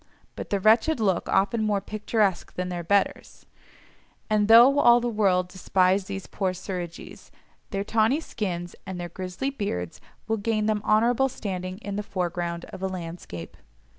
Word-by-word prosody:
But - - -7
the 200 - 0
wretched 225 +9 +4
look 195 -5 0
often 210 +4 +2
more 210 -2 +1
picturesque 210 -1 -1
than 180 0 -3
their 175 -1 -4
betters; 200 +4 0 0.9
and 210 -1 +3
though 240 +5 +8
all 240 -3 +6
the 240 - -2
world 195 -5 +2
despise 185 +1 +1
these 195 0 -6
poor 190 -2 -2
Suridgees, 180 -2 -7 0.4
their 195 -2 -2
tawny 225 +6 +2
skins 180 - -4
and 185 -2 -5
their 175 0 -5
grisly 185 +10 -4
beards 90 - -4 0.3
will 225 0 0
gain 215 0 0
them 215 -1 +1
honourable 235 +5 +3
standing 185 -6 -5
in 200 0 -4
the - - -1
foreground 175 -3 -3
of - - -8
a 190 - 0
landscape. 165 - -7
200 Hz, 160 wpm, -26 LUFS, 180-220 Hz, 0.9 s, though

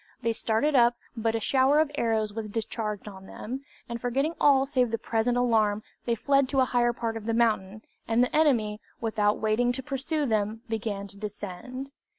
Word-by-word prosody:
They 230 0 +1
started 225 +7 +1
up, 240 -2 +5 0.2
but 225 -1 0
a - - +1
shower 265 +6 +3
of 310 -2 +2
arrows 220 -6 0
was 215 -1 -4
discharged 215 -1 -3
on 190 -2 -10
them, 260 +5 -6 0.2
and 235 -1 -5
forgetting 270 +6 0
all 270 -2 +5
save 255 -3 +1
the 230 - -1
present 230 +2 0
alarm, 220 -4 +2 0.2
they 235 - +1
fled 275 +3 +2
to 275 - +1
a 260 - +5
higher 240 -1 +2
part 230 -1 -3
of 220 0 -8
the 230 - +1
mountain, 215 -3 +1 0.2
and 230 +2 +3
the 250 - -1
enemy, 230 -9 +2 0.2
without 210 -2 +1
waiting 220 +3 +1
to 265 - -3
pursue 285 +4 -1
them, 215 -2 0
began 215 -3 -3
to 200 - -9
descend. 210 +6 -6
230 Hz, 190 wpm, -27 LUFS, 215-255 Hz, 0.2 s, up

